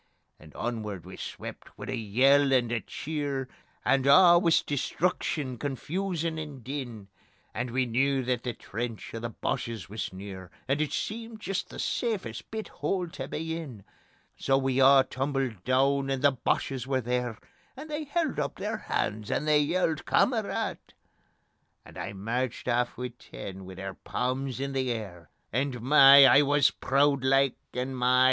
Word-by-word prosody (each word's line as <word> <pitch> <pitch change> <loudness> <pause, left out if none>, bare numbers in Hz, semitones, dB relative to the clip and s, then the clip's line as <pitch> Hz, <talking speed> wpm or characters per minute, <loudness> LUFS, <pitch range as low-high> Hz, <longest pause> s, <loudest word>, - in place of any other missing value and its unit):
And 75 -1 -16
onward 105 -7 -4
we - - -9
swept - - -8
wi' - - -7
a - - -1
yell 135 +6 +4
and 120 -3 +2
a 120 - +1
cheer, 140 +2 -4 0.4
And 135 0 +3
a' 175 +3 +8
wis 165 -2 +3
destruction, 145 -3 -1
confusion 165 - -2
and 145 -5 -7
din, 120 -7 -6 0.4
And 120 +2 -3
we 130 +2 +1
knew 135 +3 +1
that 125 -1 -1
the 125 -1 -3
trench 115 +1 -6
o' 115 - -4
the 115 +1 -4
Boches 115 -4 -4
wis 110 +2 -4
near, 95 -1 -8 0.2
And 140 +3 +1
it 155 - -1
seemed 225 0 -4
jist 195 -2 -3
the - - -10
safest 225 -5 -2
bit 220 -1 -5
hole 180 -3 -2
tae 135 -4 -6
be 160 +3 -3
in. 135 -12 -7 0.5
So 135 - +1
we 135 0 +1
a' 135 0 +7
tumbled 135 -8 -2
doon, 135 +2 +2
and 135 0 -1
the 145 - +6
Boches 130 0 -1
were 130 -1 +1
there, 120 -1 -2 0.4
And 300 +3 -8
they 305 0 -4
held 310 - -1
up 140 -1 -2
their - - -3
hands, 105 0 -2
and 150 - -1
they 150 -1 +5
yelled: 160 +1 0
"Kamarad!" 225 -5 +1 1.1
And - - -11
I - - -5
merched 115 +6 -3
aff 120 0 0
wi' 125 0 -3
ten, 95 -1 -9
wi' 95 0 -9
their 95 +1 -6
palms 130 +4 -3
in 140 0 -3
the 130 -2 0
air, 95 -8 -6 0.2
And 130 0 -1
my! 140 +2 +8
I 135 +2 +7
wis 145 0 +4
prood 140 0 +2
like, 135 0 +3 0.2
and 130 +1 -2
my! 125 0 +3
135 Hz, 165 wpm, -28 LUFS, 120-145 Hz, 1.1 s, a